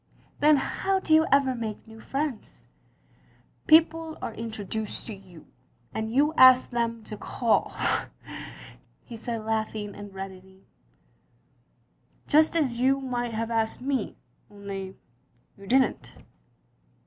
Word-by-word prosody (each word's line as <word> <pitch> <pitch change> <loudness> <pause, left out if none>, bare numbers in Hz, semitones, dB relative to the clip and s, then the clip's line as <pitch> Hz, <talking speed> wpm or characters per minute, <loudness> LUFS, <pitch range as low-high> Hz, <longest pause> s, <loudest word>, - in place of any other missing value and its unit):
"Then 300 0 +6
how 385 +7 0
do 320 - 0
you 315 +1 +5
ever 275 -1 +4
make 225 -3 -5
new 225 0 -13
friends?" 275 -1 -4 1.0
"People 325 0 +4
are - - -5
introduced 220 -1 -5
to 225 - -5
you 185 -5 -14 0.3
— 120 0 -37
and 220 0 -3
you 290 +5 +3
ask 255 0 +7
them 230 -1 -1
to 215 - -7
call 230 +2 0 0.5
— - - -10
" - - -20
he 235 - -9
said 225 -1 -5
laughing 220 -2 -2
and 205 -1 -9
reddening, 190 0 -10 1.6
"just 310 +2 +4
as 255 -7 0
you 265 +2 +3
might 245 -3 -3
have 230 +1 -2
asked 225 -1 0
me, 265 -4 -2 0.3
only 195 -2 -7 0.6
you 200 0 -14
didn't." 260 +2 +1
230 Hz, 130 wpm, -27 LUFS, 210-270 Hz, 1.6 s, ask